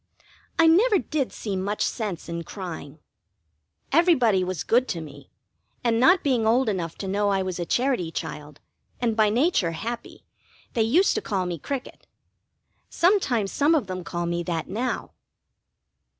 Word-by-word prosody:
I 330 - +5
never 400 +7 +5
did 300 -6 -2
see 205 -3 -4
much 200 +3 -1
sense 205 -8 -4
in 170 0 -4
crying. 165 -6 -7 0.9
Everybody 260 - +4
was 185 -3 -3
good 245 +3 +2
to 170 - -3
me, 145 -3 -11 0.5
and 230 -1 +2
not 350 +9 +5
being 250 -7 +2
old 240 +1 +3
enough 170 -5 -3
to 195 - -5
know 205 +2 +1
I 195 -1 +1
was 185 -1 -4
a 170 - -3
Charity 245 -10 0
child, 150 -2 -6 0.4
and 235 -2 0
by 215 -1 +4
nature 225 - +2
happy, 235 +7 -6 0.5
they 230 - +1
used 295 - +4
to 430 - -1
call 195 - -1
me 175 -2 -4
Cricket. 270 - -6 0.8
Sometimes 275 - +2
some 300 +3 +3
of 290 - +1
them 185 -1 -5
call 175 0 -3
me 170 0 -1
that 170 -2 -3
now. 240 +6 -3
210 Hz, 160 wpm, -25 LUFS, 175-260 Hz, 0.9 s, I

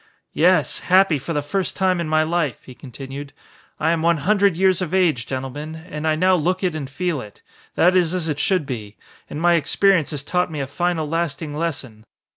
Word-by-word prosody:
"Yes, 180 +3 +3
happy 185 -4 +3
for 150 - -6
the 145 -1 -1
first 190 +5 -2
time 185 -2 +1
in 160 - -3
my 155 0 +3
life," 160 -4 -1
he 130 - -12
continued. 135 +3 -9 0.5
"I 160 +1 +2
am 165 -1 0
one 170 0 +3
hundred 200 +3 +2
years 190 0 +3
of 180 0 -2
age, 160 -10 +2
gentlemen, 135 +4 -5
and 160 -1 -6
I 155 - +2
now 185 +4 +3
look 180 +2 0
it 180 -3 +1
and 145 -4 -5
feel 160 0 -2
it. 105 -3 -13 0.3
That 180 +2 +4
is 180 -1 +2
as 175 -3 -2
it 150 -2 -2
should 185 -1 +1
be. 110 -6 -6 0.3
And 150 - -5
my 175 +1 +4
experience 170 +1 +3
has 145 -3 -4
taught 180 +4 0
me 155 - -4
a 135 - -1
final 160 +3 -1
lasting 155 -2 -3
lesson. 140 -9 -4
160 Hz, 210 wpm, -21 LUFS, 145-180 Hz, 0.5 s, That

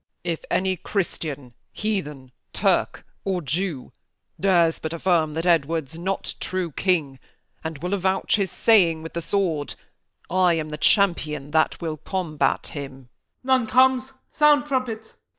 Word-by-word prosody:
Cham. 175 - +1
If 160 - -9
any 190 0 +1
Christian, 155 - -3 0.2
Heathen, 150 -12 -3 0.2
Turk, - - +1 0.2
or 190 -2 -1
Jew, 160 -1 -3 0.5
Dares 175 -4 +3
but 160 +1 -4
affirm 165 -3 +1
that 165 +1 -2
Edward's 160 -2 +1
not 190 +2 -2
true 185 -3 -2
king, 150 -6 0 0.4
And 160 -1 -4
will 180 +2 -1
avouch 190 -1 +1
his 195 -2 0
saying 170 -9 +3
with 165 - -8
the 170 - -3
sword, 165 -6 -1 0.5
I 180 -1 +3
am 155 -1 -3
the 150 - -5
Champion 155 -9 +2
that 160 0 +2
will 160 -2 -3
combat 165 -2 -1
him. 140 -3 -6
Y. - - -14 0.5
Mor. 260 0 +4
None 230 - -4
comes: 260 +2 +3 0.2
sound, 295 -1 +4
trumpets! 250 -6 -3
170 Hz, 150 wpm, -24 LUFS, 155-195 Hz, 0.5 s, Mor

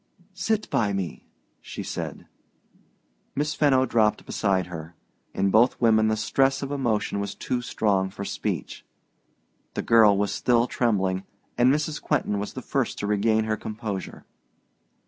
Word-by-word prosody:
"Sit 210 +4 -1
by 105 -3 +1
me," 95 -5 -4 0.3
she - - -7
said. - - -5 1.1
Miss 150 +2 0
Fenno 135 -4 +3
dropped 110 -3 +1
beside 95 -3 0
her. 85 -1 -8 0.4
In 100 0 +1
both 115 +5 +4
women 110 -2 +4
the 110 0 +1
stress 135 +6 +1
of 140 - -4
emotion 120 -7 0
was 100 0 -4
too 125 +3 -2
strong 100 -5 0
for 100 +1 -7
speech. - - -4 0.9
The - - -2
girl 110 -3 +6
was 100 0 0
still 120 -1 +2
trembling, 95 -7 0 0.3
and 125 +2 +4
Mrs. 150 +1 -1
Quentin 105 -9 0
was 105 - -5
the - - -7
first - - -1
to - - -3
regain 110 +2 +2
her 110 0 0
composure. 105 -3 -6
110 Hz, 145 wpm, -25 LUFS, 100-125 Hz, 1.1 s, girl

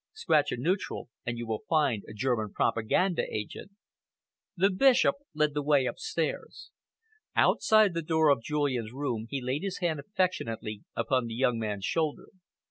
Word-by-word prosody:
'Scratch 160 - +2
a - - -2
neutral 175 +1 -2 0.2
and 120 0 -2
you 115 -2 -3
find 145 -10 +2
a - - -9
German 110 -3 -1
propaganda 165 - +1
agent!'" 110 - -6 0.8
The 195 +3 +4
Bishop 260 +7 +4 0.2
led 150 -1 +2
the 145 - -1
way 145 -2 +3
upstairs. 445 -2 -4 0.6
Outside 215 -3 +4
the 165 - -1
door 160 -1 +2
of 140 -5 +3
Julian's 130 -5 -1
room, 125 -5 -3
he 140 - -2
laid 130 +4 -1
his 195 -1 -3
hand 170 -5 -1
affectionately 115 - -2
upon 130 -3 0
the 115 - -5
young 125 -2 +1
man's 105 -3 -3
shoulder. 160 -3 -1
145 Hz, 150 wpm, -29 LUFS, 115-170 Hz, 0.8 s, The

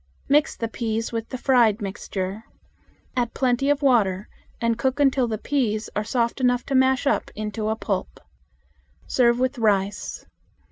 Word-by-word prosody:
Mix 295 +2 +3
the 230 - -3
peas 225 0 -3
with 230 -1 -4
the 255 - -4
fried 240 -5 +3
mixture. 195 +1 -5 0.7
Add 240 -2 -1
plenty 260 +1 +1
of 290 0 +1
water 210 -7 +2 0.3
and 230 0 +1
cook 260 +4 -1
until 270 -3 +3
the 220 -1 -2
peas 225 -4 -1
are 210 - 0
soft 235 +3 -1
enough 245 -1 +2
to 275 - -4
mash 260 +1 +3
up 280 - +1
into 215 0 -3
a 220 - 0
pulp. 200 -4 -3 0.9
Serve 235 -2 +3
with 255 +1 -1
rice. 200 -3 0
235 Hz, 155 wpm, -24 LUFS, 215-260 Hz, 0.9 s, Mix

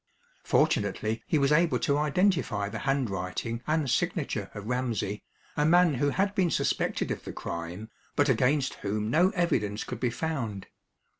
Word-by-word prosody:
Fortunately 110 +1 +1
he 155 - +2
was 140 0 +2
able 165 +2 +4
to 140 - +1
identify 150 - +1
the - - -5
handwriting 115 -2 -2
and 155 -2 +1
signature 135 - -1
of 105 -1 -7
Ramsey, 115 -4 -2 0.3
a 150 - +1
man 175 +1 +5
who 145 +2 +1
had 195 +6 0
been 185 -4 +2
suspected - - 0
of - - -4
the - - -6
crime, 85 +6 -6 0.3
but 145 - +3
against 130 +2 +2
whom 105 +2 -2
no 175 +6 +4
evidence 110 - 0
could - - -6
be 125 - +1
found. 120 -7 -3
130 Hz, 155 wpm, -28 LUFS, 105-160 Hz, 0.3 s, man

